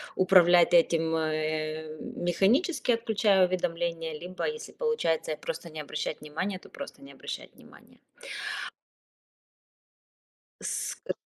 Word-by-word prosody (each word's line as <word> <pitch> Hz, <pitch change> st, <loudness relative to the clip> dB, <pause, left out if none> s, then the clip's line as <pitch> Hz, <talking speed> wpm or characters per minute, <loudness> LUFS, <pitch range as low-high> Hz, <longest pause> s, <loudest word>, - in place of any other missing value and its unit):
управлять 175 Hz, -2 st, +6 dB
этим, 165 Hz, -1 st, +4 dB
э, 155 Hz, 0 st, -2 dB
механически, 245 Hz, -, +1 dB
отключая 215 Hz, -5 st, +3 dB
уведомления, 170 Hz, -2 st, -2 dB
либо, 180 Hz, +1 st, -4 dB
если 460 Hz, 0 st, -5 dB
получается 165 Hz, -, 0 dB
просто 170 Hz, -, -5 dB
не 155 Hz, -1 st, -5 dB
обращать 150 Hz, +1 st, -4 dB
внимания- 180 Hz, +6 st, -3 dB
то -, -, -16 dB
просто 280 Hz, -, -9 dB
не 275 Hz, -, -12 dB
обращать -, -, -7 dB
внимания. -, -, -18 dB, 2.6 s
Ск 485 Hz, -, -3 dB
175 Hz, 100 wpm, -29 LUFS, 160-200 Hz, 2.6 s, управлять